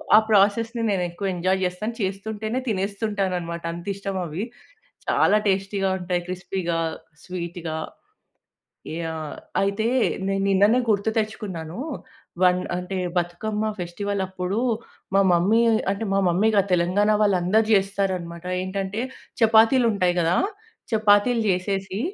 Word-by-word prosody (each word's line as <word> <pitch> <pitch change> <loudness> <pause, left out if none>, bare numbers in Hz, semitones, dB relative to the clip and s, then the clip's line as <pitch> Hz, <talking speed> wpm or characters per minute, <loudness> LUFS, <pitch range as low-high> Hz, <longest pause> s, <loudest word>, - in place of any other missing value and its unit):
ఆ - - +10
ప్రాసెస్‌ని 225 +4 +3
నేను 190 -3 0
ఎక్కువ 195 +3 -4
ఎంజాయ్ 185 +2 +1
జేస్తాను. 185 +6 -2
చేస్తుంటేనే 215 +4 -3
తినేస్తుంటానన్నమాట 195 -4 -2
అంతిష్టం 195 +3 -4
అవి 170 +5 -4 0.7
చాలా 210 - +4
టేస్టీ‌గా 195 0 +1
ఉంటాయి 180 -1 -1
క్రిస్పీ‌గా, 180 -1 -3 0.4
స్వీట్‌గా 170 -2 -5 1.2
యాహ్! 160 -2 -4 0.3
అయితే 200 +3 0 0.4
నేను 195 0 0
నిన్ననే 200 +5 +4
గుర్తు 210 0 +2
తెచ్చుకున్నాను 195 -7 -4 0.7
వన్ 180 0 +4 0.2
అంటే 180 +1 -4 0.2
బతుకమ్మ 210 +5 -2
ఫెస్టివల్ 195 +3 -3
అప్పుడు 185 +2 -3 0.6
మా - - +6
మమ్మీ 190 +7 +4 0.3
అంటే 200 +3 -3
మా 195 - +3
మమ్మీ 185 +6 +3
గాదు 200 -1 +2
తెలంగాణ 180 +4 +2
వాళ్ళు 200 -3 +3
అందరూ 215 +5 +3
జేస్తారన్నమాట 190 -4 0 0.2
ఏంటంటే 195 +3 -3 0.4
చపాతీలు 225 +3 +5
ఉంటాయి 180 -3 +1
గదా! 170 +2 +2 0.6
చపాతీలు 215 +2 +4
జేసేసి 195 +1 -1
195 Hz, 115 wpm, -24 LUFS, 180-210 Hz, 1.2 s, ఆ